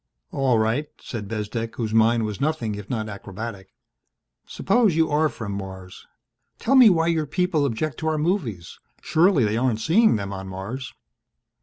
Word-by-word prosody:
"All 135 -4 +2
right," 115 +7 0
said 110 -4 -6
Bezdek, 115 +2 -4
whose 110 -3 -3
mind 115 0 +3
was 105 +1 -5
nothing 140 -8 -1
if 100 -1 -8
not 110 -4 -2
acrobatic. 100 0 -7 0.8
"Suppose 210 -3 +2
you 160 -1 +2
are 155 +1 +3
from 110 -7 -6
Mars. 95 -2 -8 0.5
Tell 265 - 0
me 255 -4 +8
why 165 -3 +2
your 160 -2 0
people 165 -1 0
object 135 +3 -3
to 160 - -3
our 155 -1 +1
movies. 150 - -2 0.2
Surely 160 - +3
they 105 +1 0
aren't 120 -3 +1
seeing 210 - +4
them 100 -2 -4
on 95 0 -6
Mars?" 100 +8 -6
120 Hz, 165 wpm, -23 LUFS, 105-155 Hz, 0.8 s, me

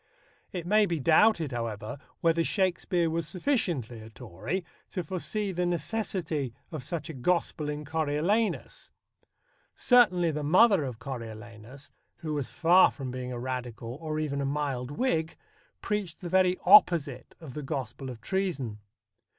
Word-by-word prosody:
It 175 -3 -5
may 210 +3 +4
be 170 -3 -1
doubted, 165 +1 +4
however, 115 0 -4 0.2
whether 165 0 +3
Shakespeare 180 -2 +1
was 165 -1 -2
sufficiently 170 - -1
a 110 - -11
Tory 120 - -5 0.2
to 180 - -3
foresee 190 +4 -3
the 180 -1 -1
necessity 170 - -2 0.2
of 155 -5 -5
such 160 +2 -4
a 160 - -6
gospel 150 +2 0
in 150 0 -4
Coriolanus. 160 - -1 0.9
Certainly, 185 -9 +4
the 150 0 -3
mother 185 +4 +5
of 125 -4 -5
Coriolanus, 115 +1 -9 0.3
who 155 -3 -4
was 145 -3 -2
far 175 +3 +5
from 135 -3 -6
being 125 0 -5
a 125 - -4
Radical, 120 -2 -5
or 155 -1 -3
even 145 -2 -2
a - - -1
mild 135 -3 -2
Whig, 160 - -1 0.4
preached 205 -6 -3
the 175 - -5
very 185 0 +3
opposite 165 -9 +5
of 155 -6 -10
the 150 - -5
gospel 135 -1 -5
of 120 -3 -9
treason. 140 - -2
155 Hz, 145 wpm, -28 LUFS, 130-180 Hz, 0.9 s, mother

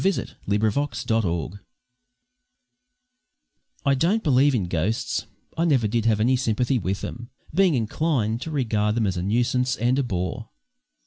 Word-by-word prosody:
WE 195 - +4
CALLED - - -4 0.2
HIM 100 +1 +1
"ALLY" 110 - +3
FOR 145 +2 -2 0.2
SHORT 90 -6 0 2.3
I 140 - +4
don't 180 +11 +1
believe 140 -1 +4
in 100 -7 -1
ghosts; 110 +6 -1 0.3
I 165 - 0
never 135 -9 +3
did 115 +1 -1
have 110 -2 +3
any 125 +4 +3
sympathy 125 +1 0
with 95 +1 -2
them, 120 0 -7 0.2
being 180 -2 +4
inclined 115 -1 0
to 160 - -5
regard 110 -7 0
them 115 -2 +1
as 95 -2 0
a - - -1
nuisance 120 +5 +1
and 125 +4 +1
a - - +2
bore. 95 0 -3
120 Hz, 165 wpm, -24 LUFS, 105-135 Hz, 2.3 s, WE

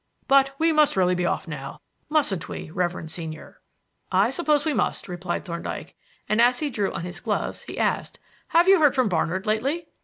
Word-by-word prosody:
But 275 0 +4
we 325 +2 +3
must 305 -2 +4
really 180 -1 +3
be 180 -1 0
off - - -2
now, 140 -4 -7 0.3
mustn't 280 - 0
we, 155 - -7
reverend 175 -2 -2
senior?" 160 -2 -8 0.5
"I 200 +6 +3
suppose 300 -1 +1
we 310 - +1
must," - - -1
replied 175 -1 -4
Thorndyke; 170 -1 -6 0.3
and, 215 +2 +2
as 245 +1 +4
he 295 0 -2
drew 205 -4 -1
on - - -5
his 175 0 -6
gloves, - - -2
he - - -9
asked: - - -1 0.3
"Have 340 +2 +4
you 390 -1 +7
heard 295 -3 +4
from 255 -5 +2
Barnard 180 +2 -1
lately?" 270 +10 -1
215 Hz, 190 wpm, -24 LUFS, 175-290 Hz, 0.5 s, you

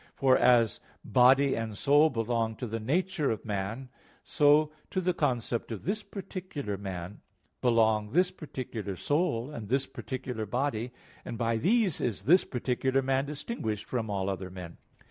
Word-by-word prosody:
For 130 -1 +4
as 120 -4 +4 0.3
body 130 +2 +5
and 110 -2 -4
soul 145 +5 +5
belong 115 -2 -1
to 125 - -5
the 115 0 -3
nature 155 +5 0
of 110 - -3
man, 105 +5 -3 0.4
so 150 +1 +4 0.2
to 185 - -1
the 180 0 +1
concept 120 -7 -1
of 110 - -5
this 210 +3 -1
particular 185 - -6
man 95 -1 -6 0.4
belong 110 -3 +3
this 180 +6 +3
particular 115 - -6
soul 145 - 0
and 110 -7 -7
this 135 +2 +2
particular 125 -5 -5
body; 125 0 -1 0.3
and 115 - -6
by 115 0 0
these 195 - +2
is 110 -5 -2
this 175 - +5
particular 130 +1 0
man 135 +1 +1
distinguished 140 - -4
from 115 -4 -3
all 100 -2 -1
other 95 -1 -3
men. 90 -2 -9
125 Hz, 155 wpm, -29 LUFS, 110-145 Hz, 0.4 s, body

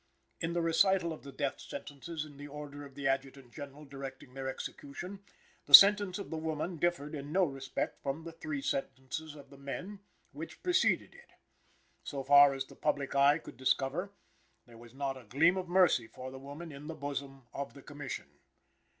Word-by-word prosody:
In 165 +1 -2
the 170 -1 0
recital 170 +1 +3
of 155 - -10
the 140 - -10
death 135 +1 -2
sentences 155 +2 -6
in 145 -2 -13
the 145 +1 -8
order 145 0 -8
of 140 -2 -12
the 140 -1 -2
Adjutant 135 -2 -2
General 145 +1 -9
directing 135 -2 -9
their 135 0 -5
execution, 180 +9 -7 0.4
the - - +14
sentence 200 -2 +8
of 200 - -7
the 160 - -2
woman 160 +2 -3
differed 160 -3 0
in 145 -1 -6
no 190 +3 +4
respect 135 -4 -3
from 140 +4 -3
the 165 - -7
three 155 -4 -5
sentences 135 +4 -3
of 140 -2 -13
the 140 - -14
men 180 +9 -6 0.3
which - - -9
preceded 360 -1 +2
it. 485 - -17 0.7
So 140 -2 -4
far 140 0 +7
as 135 0 -3
the - - -15
public 145 -2 -1
eye 140 +2 +5
could 160 - -12
discover, 135 +8 0 0.6
there 115 -1 -15
was 120 +1 -14
not 135 -1 -2
a 130 - -12
gleam 140 - +4
of 185 -2 -4
mercy 175 -10 +4
for 130 +2 -8
the 130 - -9
woman 145 +5 -8
in 145 +1 -9
the 160 - -5
bosom 140 -2 -5
of 140 -2 -5
the 140 - -12
Commission. 145 -3 -6
145 Hz, 190 wpm, -32 LUFS, 135-165 Hz, 0.7 s, the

